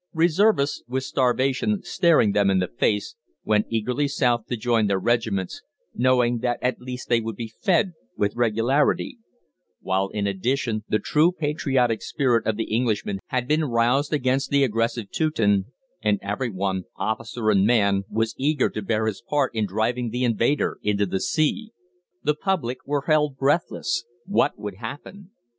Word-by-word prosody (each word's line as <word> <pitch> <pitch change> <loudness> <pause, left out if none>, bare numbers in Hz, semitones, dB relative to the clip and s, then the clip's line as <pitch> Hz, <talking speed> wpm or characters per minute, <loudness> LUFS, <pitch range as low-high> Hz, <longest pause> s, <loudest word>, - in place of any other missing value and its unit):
Reservists, 165 -2 +2
with 130 +2 -2
starvation 135 - 0
staring 160 - +3
them 100 -1 +2
in 95 - +3
the 90 -1 +1
face, 105 -3 0 0.3
went 105 -1 +1
eagerly 125 +6 0
south 120 -5 0
to 125 - -3
join 115 -1 +1
their 100 -1 +1
regiments, 105 -3 -1 0.3
knowing 125 -1 +2
that 120 0 -1
at 125 -1 -1
least 125 0 -7
they 120 -1 +2
would 115 -1 -5
be 115 0 -7
fed 185 -2 +2 0.2
with 100 0 0
regularity; 120 - +1 0.6
while, 95 +1 0
in 105 -1 -2
addition, 110 +3 -1
the 110 - +3
true 150 - +2
patriotic 135 -8 0
spirit 125 -5 0
of 110 -2 0
the 115 - 0
Englishman 110 -4 -1
had 125 -1 -2
been 155 +2 +2
roused 125 +3 +1
against 135 -2 0
the 140 0 +3
aggressive 115 -2 -1
Teuton, 105 - +1 0.4
and 105 -1 +2
everyone, 100 -3 -2
officer 110 0 -1
and 100 0 +3
man, 100 -4 +3
was 110 0 -1
eager 145 0 +1
to 110 - -4
bear 110 +2 0
his 110 -3 -3
part 140 +2 0
in 110 -2 0
driving 115 +5 -1
the 125 +3 -2
invader 120 +4 +1
into 105 -1 +1
the 95 0 -2
sea. 220 +9 0 0.5
The 150 - +2
public 150 -7 -2
were 145 -1 0
held 150 -3 +2
breathless. 140 -1 0 0.2
What 190 -6 +1
would 105 -3 -6
happen? 145 - -9
120 Hz, 160 wpm, -24 LUFS, 110-140 Hz, 0.6 s, staring